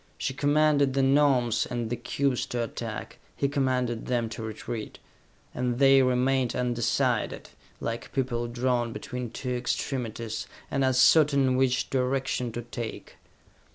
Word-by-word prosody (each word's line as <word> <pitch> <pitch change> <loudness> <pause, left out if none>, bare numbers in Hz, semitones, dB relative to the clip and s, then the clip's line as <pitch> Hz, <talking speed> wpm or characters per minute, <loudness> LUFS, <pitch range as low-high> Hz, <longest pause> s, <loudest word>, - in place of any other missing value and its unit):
She 135 - -2
commanded 145 -1 +3
the 135 - +3
Gnomes 135 -5 +3
and 120 -2 -3
the - - +1
cubes 130 +2 -1
to 120 -1 -2
attack, 115 - -6 0.2
he 140 - +1
commanded 130 -4 -1
them 120 -2 0
to 115 - -7
retreat, 110 0 -6 0.6
and 125 -1 -1
they 135 0 +6
remained 130 0 +2
undecided, 120 0 0 0.3
like 115 0 -4
people 125 -3 -1
drawn 120 -1 0
between 125 -1 -5
two 125 +2 -5
extremities, 120 -3 -3 0.2
and 135 - +1
uncertain 135 0 +4
which 130 -1 +1
direction 130 -2 0
to 120 - -4
take. 120 -1 -7
125 Hz, 130 wpm, -27 LUFS, 120-135 Hz, 0.6 s, they